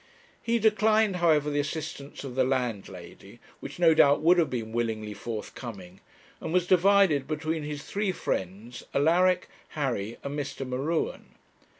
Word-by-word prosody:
He 235 0 +1
declined, 215 -2 +3
however, 155 -4 +3
the 145 - 0
assistance 145 -1 -5
of 135 -3 -6
the 130 +1 +2
landlady, 110 -5 -4 0.2
which - - -8
no 170 -2 +5
doubt 145 -2 +5
would 175 +3 +5
have 160 -4 +2
been 115 -3 -4
willingly 110 -2 -2
forthcoming, 105 -3 -7 0.4
and - - -5
was 180 0 +2
divided 185 -6 +4
between 155 +1 -2
his 150 -1 -5
three 205 -1 -1
friends, 105 - -4
Alaric, 180 +5 +3 0.3
Harry, 120 -6 -2
and 140 +1 -4
Mr. 135 -1 -5
M'Ruen. 140 +6 -3
145 Hz, 140 wpm, -27 LUFS, 120-170 Hz, 0.4 s, no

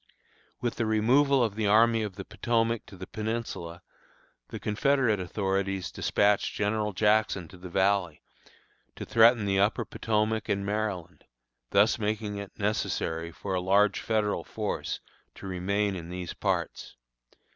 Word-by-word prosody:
With 120 -1 -2
the 115 - 0
removal 130 +5 +4
of 110 -4 0
the 110 0 -1
Army 115 +2 +5
of 105 -3 -4
the 95 - -7
Potomac 115 -1 0
to 95 - -12
the 95 - -7
Peninsula 105 -6 -5 0.6
the - - -7
Confederate 125 -1 +1
authorities 95 0 -2
despatched 100 0 +1
General 105 +1 0
Jackson 105 -3 +2
to 90 - -13
the 90 0 -8
Valley, 95 -3 +1 0.7
to - - -6
threaten 115 -1 +5
the 95 -1 +1
upper 100 +2 +2
Potomac 110 0 -1
and 100 0 0
Maryland, 100 -4 -3 0.4
thus 100 +4 +4
making 105 -1 -2
it 100 -1 -8
necessary 85 -6 -1
for 95 +4 -5
a 90 - 0
large 100 +3 +3
Federal 110 -2 0
force - - -3 0.4
to - - -11
remain 100 +2 -1
in 85 -2 -7
these 90 -1 -5
parts. - - -2
105 Hz, 145 wpm, -28 LUFS, 95-110 Hz, 0.7 s, Army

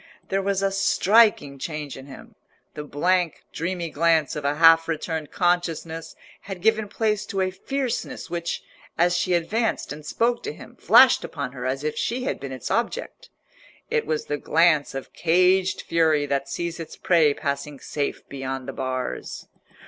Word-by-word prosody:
There 195 0 +1
was 195 0 0
a 195 - +2
striking 195 -6 +3
change 150 -1 -5
in 135 +1 -11
him: 135 - -12 0.4
the 150 - -6
blank, 175 +4 0
dreamy 170 0 -3
glance 160 -1 +2
of 150 - -4
a 140 +1 +1
half 165 +1 +6
returned 160 -1 -3
consciousness 165 -3 -1 0.3
had 190 -3 -8
given 220 -1 +2
place 210 0 0
to 195 - -3
a 185 0 0
fierceness 260 +6 -3
which, 170 -1 -3 0.3
as 175 +1 +3
she 175 +1 +1
advanced 215 +3 -1
and 150 +1 -10
spoke 235 +8 0
to 435 +2 -5
him, - - -13
flashed 260 -2 +6
upon 140 -5 -5
her 130 -1 -5
as 135 +2 -2
if 155 0 -2
she 250 +2 -2
had 265 - -2
been 140 -1 -6
its 130 -3 -5
object. - - -2 0.6
It - - 0
was 155 -1 -1
the 145 - -2
glance 155 -2 +2
of 135 - -7
caged 185 +3 +2
fury 160 -3 +2
that 140 -1 -2
sees 170 0 -4
its 165 - -7
prey 160 -5 +3
passing 140 0 -4
safe 145 -2 -4
beyond 135 -1 -5
the 135 - -5
bars. 130 -1 -4
165 Hz, 170 wpm, -24 LUFS, 145-185 Hz, 0.6 s, half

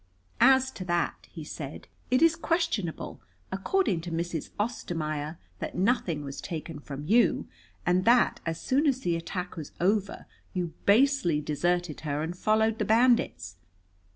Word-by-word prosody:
"As 265 +1 +5
to 185 - -7
that," 175 -1 -1
he 160 - -8
said, 150 -2 -7 0.2
"it 255 +5 +4
is 330 0 +5
questionable, 330 - -2 0.3
according 195 - +1
to 170 +1 -6
Mrs. 165 -1 -3
Ostermaier, 160 -8 -2 0.2
that - - -5
nothing 180 -7 +1
was 140 -1 -6
taken 160 -2 -6
from 145 0 -7
you, 230 +8 +3 0.4
and 180 +1 +3
that 235 0 +4
as 165 -1 -3
soon 280 +4 +1
as 265 -2 +1
the 175 -6 0
attack 180 +2 -4
was 155 -4 -7
over 200 +2 0 0.3
you 175 -3 -2
basely 235 - +4
deserted 175 +2 -1
her 150 -1 -2
and 170 +2 -4
followed 220 +3 +2
the - - +1
bandits. 220 - +2
180 Hz, 150 wpm, -28 LUFS, 160-235 Hz, 0.4 s, As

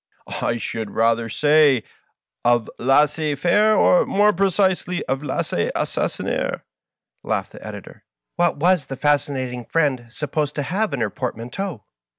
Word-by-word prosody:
" - - -30 0.2
I 115 - 0
should 110 -2 -4
rather 115 0 +2
say 145 -2 +4 0.6
of 120 -2 +2
lamez 150 +3 +2
faire^ 205 +6 +3
or, 180 - +5
more 210 +1 +3
precisely, 185 -1 +1
of 135 +1 -1
lainez 145 - -2
asaamner^'''* - - -2 0.6
laughed - - -2
the - - -12
Editor. - - -10 0.2
" - - -62
What 175 -3 +1
was 170 -2 +2
the 135 - -5
Fascinating 135 -4 0
Friend 135 -4 0
supposed 150 +3 -3
to 145 - -1
have 200 +7 -1
in 130 - -2
her 110 -3 0
port 125 -4 -4
manteau 125 - -5
145 Hz, 150 wpm, -22 LUFS, 125-175 Hz, 0.6 s, or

